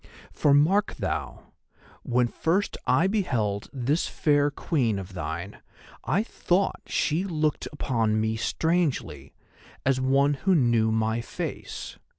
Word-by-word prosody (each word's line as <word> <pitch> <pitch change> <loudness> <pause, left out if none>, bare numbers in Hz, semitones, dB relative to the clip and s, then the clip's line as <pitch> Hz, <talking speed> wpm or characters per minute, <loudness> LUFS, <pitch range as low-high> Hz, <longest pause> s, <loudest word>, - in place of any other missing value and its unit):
For 145 - +2
mark 165 +9 +3
thou, - - -4 0.5
when 125 0 +1
first 175 - 0
I 170 - +4
beheld 125 - -1
this 140 +5 0
fair 145 -1 +2
Queen 135 - 0
of 95 0 -7
thine 85 +3 -5 0.4
I 195 +7 +1
thought 195 -3 0
she 160 +4 0
looked 155 -5 -1
upon 115 -7 0
me 110 +1 0
strangely, 140 - -1 0.5
as 130 -1 +2
one 140 +2 +3
who 190 -1 +3
knew 120 -6 +3
my 110 +1 0
face. - - -6
135 Hz, 125 wpm, -26 LUFS, 110-160 Hz, 0.5 s, I